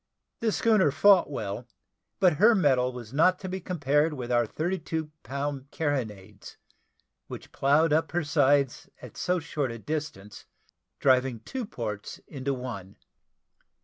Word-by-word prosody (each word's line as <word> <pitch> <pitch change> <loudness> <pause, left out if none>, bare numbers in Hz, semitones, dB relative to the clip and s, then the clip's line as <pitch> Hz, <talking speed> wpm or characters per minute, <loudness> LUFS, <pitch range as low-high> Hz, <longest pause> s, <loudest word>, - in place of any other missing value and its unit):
The 225 -1 +1
schooner 215 -7 +3
fought 180 +6 +5
well; 110 -3 -5 0.5
but 180 -6 +4
her 220 +6 +6
metal 130 -8 +2
was 120 -2 -9
not 180 +5 +4
to 190 - -5
be 190 +1 -4
compared 150 -3 +1
with 125 -2 -5
our 120 -1 +2
thirty 175 - -2
two 160 -2 -4
pound 140 0 -4
carronades, 110 -11 -4 0.7
which - - -9
ploughed 150 +3 +3
up 160 0 +1
her 175 0 0
sides 145 -3 +2
at - - -12
so 180 0 0
short 150 -4 -3
a 115 - -6
distance, 115 -7 -6 0.5
driving 130 -3 +2
two 250 - -5
ports 105 - -6
into 140 -1 -3
one. 125 -8 -6
145 Hz, 145 wpm, -27 LUFS, 125-165 Hz, 0.7 s, her